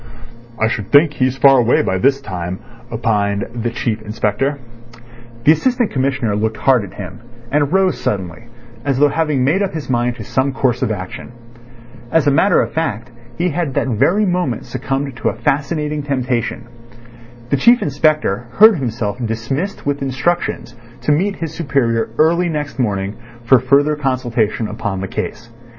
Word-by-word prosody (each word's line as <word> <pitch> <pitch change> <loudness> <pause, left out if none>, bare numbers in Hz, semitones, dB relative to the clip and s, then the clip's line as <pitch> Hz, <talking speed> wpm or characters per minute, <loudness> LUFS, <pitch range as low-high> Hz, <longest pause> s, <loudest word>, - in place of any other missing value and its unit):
"I 110 - +3
should 110 -3 -4
think 150 +1 +6
he's 130 -1 0
far 135 -1 +6
away 120 0 +3
by 95 - -1
this 135 +5 +2
time," 90 -5 -5 0.3
opined 105 -3 0
the 120 0 -2
Chief 115 -2 -2
Inspector. 110 +6 -1 0.9
The 150 - +6
Assistant 245 - +1
Commissioner 130 -5 0
looked 110 +1 -1
hard 130 -5 +3
at 95 - -10
him, 100 +2 -8 0.3
and 145 0 +1
rose 190 0 +2
suddenly, 95 +2 -3 0.4
as 140 -2 0
though 145 +1 +4
having 150 -3 0
made 155 +9 +2
up 195 -4 -2
his 150 -4 -4
mind 120 0 0
to - - -8
some 135 +1 0
course 130 -3 0
of - - 0
action. 95 +2 -6 0.8
As 165 -2 +3
a 145 - +4
matter 195 +8 +4
of - - -4
fact, 120 -7 -2 0.3
he 175 +2 +1
had 155 -3 -2
that - - 0
very 140 - +2
moment 180 - -1
succumbed 135 +2 -3
to - - 0
a - - -5
fascinating 150 +4 -1
temptation. 130 -4 -2 0.9
The 140 - +3
Chief 240 - +5
Inspector 145 -6 +1
heard 215 -1 +7
himself 120 -3 -3
dismissed 120 - -3
with 145 0 -1
instructions 135 -1 -1 0.3
to - - +1
meet 195 +7 +1
his 165 -2 -5
superior 120 -9 0
early 170 +3 +3
next 150 -3 -4
morning 100 -3 -1 0.3
for 125 +2 +5
further 140 +4 +3
consultation 120 -6 -1
upon 105 -3 -4
the 95 - -3
case. 115 +4 -5
130 Hz, 165 wpm, -18 LUFS, 115-150 Hz, 0.9 s, heard